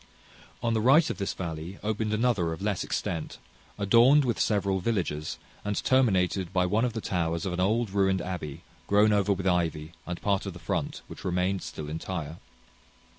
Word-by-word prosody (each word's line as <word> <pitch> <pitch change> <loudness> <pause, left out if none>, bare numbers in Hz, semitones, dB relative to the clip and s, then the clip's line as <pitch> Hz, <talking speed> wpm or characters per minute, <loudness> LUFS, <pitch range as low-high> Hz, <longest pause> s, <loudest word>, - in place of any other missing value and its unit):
On 115 -1 +1
the 110 - +1
right 140 +8 +6
of - - -7
this 100 - -2
valley 85 +1 -5
opened 110 0 -1
another 110 -7 +1
of 80 - -8
less 105 -3 0
extent, 85 -3 -3 0.4
adorned 120 +8 +5
with 120 -3 -1
several 100 -3 +1
villages, 90 -7 -2 0.3
and 105 0 -2
terminated 95 -8 +2
by 90 -2 +2
one 105 +6 +1
of 125 -2 0
the 115 - -3
towers 85 -3 -1
of 95 - -2
an 90 - -3
old 110 +3 +1
ruined 95 -1 +2
abby, 85 -6 -5 0.2
grown 105 +1 +4
over 100 -1 +2
with 95 -1 -1
ivy, 85 -3 0 0.2
and 90 -1 -4
part 100 -1 0
of 95 - -4
the - - -9
front, 85 - -3
which - - -10
remained 90 +1 0
still 75 - -6
entire. 80 0 -5
95 Hz, 180 wpm, -28 LUFS, 85-105 Hz, 0.4 s, right